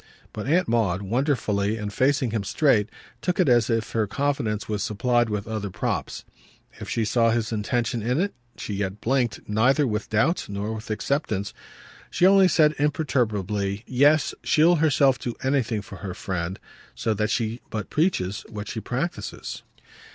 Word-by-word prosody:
But 105 +3 -5
Aunt 175 +5 +3
Maud, 100 -5 +1
wonderfully 110 -3 0
and 105 -1 -5
facing 130 +1 +2
him 110 -2 -1
straight, 110 -2 +2 0.3
took 180 0 -1
it 180 - +4
as 120 -2 +4
if 115 -1 0
her 110 -2 0
confidence 130 -5 -1
were 105 -1 -2
supplied 120 +3 +1
with 105 -1 -3
other 110 -3 -3
props. 85 -1 -3 0.5
If - - -7
she 115 - 0
saw 115 +2 +3
his 115 -1 0
intention 115 +2 -1
in 125 +6 0
it 200 +3 0 0.2
she 105 - -5
yet 100 0 -3
blinked 125 -1 0
neither 130 +8 +3
with 105 -3 -2
doubt 135 +11 +1
nor 100 +2 -3
with 110 +1 -8
acceptance; 110 -3 -1 0.6
she 180 - +2
only 195 0 +7
said 155 -3 +4
imperturbably: 105 - 0
"Yes, 145 +4 +3
she'll 170 +3 +4
herself 140 -4 +3
do 120 - -4
anything 125 -6 0
for 100 - -10
her 90 -1 -6
friend; 90 -1 -3 0.4
so 110 - 0
that 105 +1 -1
she 115 0 -1
but 110 -1 -5
preaches 120 - 0
what 105 -2 -6
she 110 - -4
practises." 135 +10 -4
115 Hz, 165 wpm, -25 LUFS, 105-140 Hz, 0.6 s, only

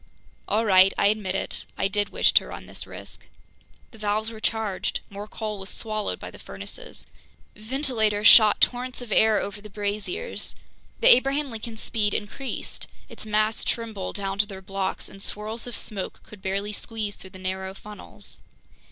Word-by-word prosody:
All 220 +2 +2
right, 190 -1 +7
I 200 - +5
admit 205 -3 -1
it: - - -3
I - - +2
did 205 +1 0
wish - - +4
to - - +5
run - - -8
this - - -7
risk! - - -7 0.6
The 225 - -14
valves 215 +1 0
were 220 - -9
charged. 220 -4 -1
More 200 +1 -6
coal 215 -1 -4
was 195 +1 -5
swallowed 215 -2 -1
by - - -7
the - - -12
furnaces. - - -8 0.5
Ventilators 220 -3 +2
shot 215 -2 +9
torrents 250 0 +2
of 235 - -10
air 220 +1 +5
over 205 +1 -5
the 210 - -10
braziers. 210 - -3 0.5
The - - +10
Abraham 275 +2 0
Lincoln's 225 0 -6
speed 210 -3 +1
increased. 240 +6 -4 0.2
Its - - -6
masts 215 +1 +2
trembled 220 -5 -3
down 195 -1 -3
to 210 - +4
their 195 -2 -8
blocks, 195 0 -3
and 195 - -11
swirls 215 +4 -4
of 240 - -4
smoke 200 -3 -5
could 210 -2 -13
barely 200 +2 -1
squeeze 215 -1 -3
through 190 - -12
the 185 - -12
narrow 190 +1 -3
funnels. 210 +1 -11
210 Hz, 170 wpm, -26 LUFS, 200-225 Hz, 0.6 s, The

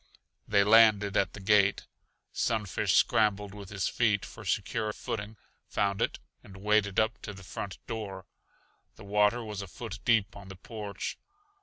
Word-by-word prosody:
They 100 -2 +4
landed 105 -2 +5
at 100 - +2
the - - -8
gate. 100 0 +3 0.5
Sunfish 105 -5 0
scrambled 105 -2 +2
with 100 -2 -9
his 100 -2 -1
feet 110 -4 +1
for - - -11
secure 110 -1 -1
footing, 105 0 -5 0.3
found 100 -1 0
it - - 0 0.3
and 95 -1 -13
waded 100 0 +2
up 110 0 0
to 105 - -6
the 95 - -12
front 95 +1 -6
door. 100 -5 -6 0.7
The - - -13
water 105 +4 +2
was 105 -2 -5
a 100 - -7
foot 100 +1 -7
deep 110 -4 +2
on 100 -1 -11
the 95 - -9
porch. 105 +1 -6
105 Hz, 160 wpm, -29 LUFS, 100-110 Hz, 0.7 s, landed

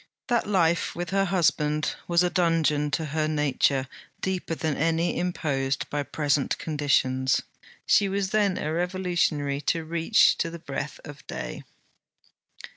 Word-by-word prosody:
That 240 -3 +1
life 170 -4 +1
with 175 -1 -4
her 195 0 +2
husband 155 -4 +1
was 170 0 +3
a 180 - +1
dungeon 165 -4 +2
to 160 +2 -1
her 155 +1 -1
nature 140 -3 +1 0.3
deeper 185 -3 -2
than 155 -3 -1
any 165 +2 +1
imposed 140 -7 -1
by 145 - 0
present 145 -1 0
conditions. 130 -4 +1 0.4
She 200 -1 +4
was 195 0 -1
then 205 -3 +2
a 155 - -2
revolutionary 175 -5 0
to 165 -1 0
reach 170 +6 +3
to 165 - 0
the 170 - -7
breath 140 -2 -5
of 145 0 -11
day. - - -6
160 Hz, 140 wpm, -26 LUFS, 145-180 Hz, 0.4 s, She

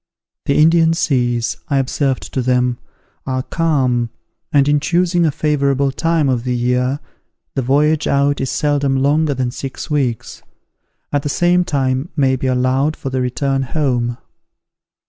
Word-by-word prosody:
"The 140 - +2
Indian 165 +1 +4
seas," 120 -7 0
I 140 -4 0
observed 135 0 -1
to 130 - 0
them, 125 -1 +1 0.5
"are 130 -1 -1
calm, 130 -8 0 0.4
and, 140 -1 +3
in 145 0 +3
choosing 175 +2 +1
a - - +1
favourable 140 -2 +1
time 165 +1 +1
of 125 -3 0
the 125 -1 -1
year, 125 +3 0 0.5
the 135 - -1
voyage 145 +4 +2
out 140 0 +1
is 135 - -1
seldom 145 -3 0
longer 145 +2 +2
than 125 -1 -1
six 135 +3 -7
weeks; 130 -6 -2 0.7
and 145 - +1
the 145 - -3
same 175 +4 +2
time 135 -1 -1
may 135 -3 +2
be 130 +1 -3
allowed 130 +4 +1
for 135 - -5
the 130 0 -1
return 135 +2 -1
home. 125 -4 -1
135 Hz, 150 wpm, -18 LUFS, 130-150 Hz, 0.7 s, Indian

